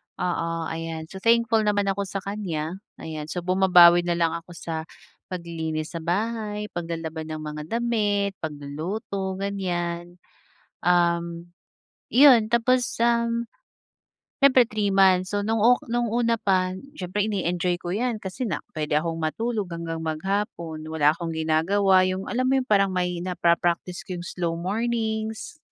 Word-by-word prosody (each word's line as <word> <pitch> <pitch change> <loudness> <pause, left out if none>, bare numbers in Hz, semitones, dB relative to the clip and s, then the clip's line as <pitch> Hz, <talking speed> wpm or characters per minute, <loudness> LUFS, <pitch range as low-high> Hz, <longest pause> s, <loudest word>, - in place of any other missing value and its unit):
oo. 165 -2 -2
Ayan, 160 0 -5
so 190 - -7
thankful 230 +1 +3
naman 210 -1 +2
ako 200 0 -3
sa 195 0 -5
kanya. 185 -4 -4 0.2
Ayan, 155 -2 -6
so 175 +2 -4
bumabawi 180 -1 +6
nalang 170 -1 +1
ako 170 +1 -7
sa 160 -1 -5 0.4
paglilinis 160 -3 -4
sa 170 - -4
bahay, 210 +4 -2
paglalaba 165 -2 -4
ng 155 - -4
mga 150 0 -5
damit, 210 -3 0
pagluluto, 165 +6 -4
ganyan. 175 -3 -3 0.7
Um, 170 -1 +1 0.6
'yon 255 -4 +7
tapos, 240 +2 +2 0.2
um, 235 0 +1 0.9
siyempre 270 -2 +6
3 205 -2 0
months, 185 0 +4
so 205 - +1
nung 225 +2 0
ok 240 +4 +4
nung 240 0 +1
una 230 0 +1
pa, 185 -4 +1 0.2
siyempre 200 -1 -2
ine-enjoy 180 -3 -1
ko 175 - -4
yan, 220 +3 -1
kasi 195 +7 -4
na 165 -9 -3 0.2
pwede 150 -1 -1
akong 165 +2 0
matulog 210 +7 -2
hanggang 165 -1 -4
maghapon, 160 -1 -3
wala 155 -2 +3
akong 165 -1 -5
ginagawa. 185 +5 +3
Yung 185 +1 -3
alam 255 +1 0
mo 265 0 +3
yung - - -12
parang 195 -2 +3
may 180 -1 -1
napa-practice 175 0 0
ko 180 -1 -5
yung 175 - -7
slow 170 -2 -2
mornings, 220 - -2
185 Hz, 140 wpm, -25 LUFS, 170-215 Hz, 0.9 s, yon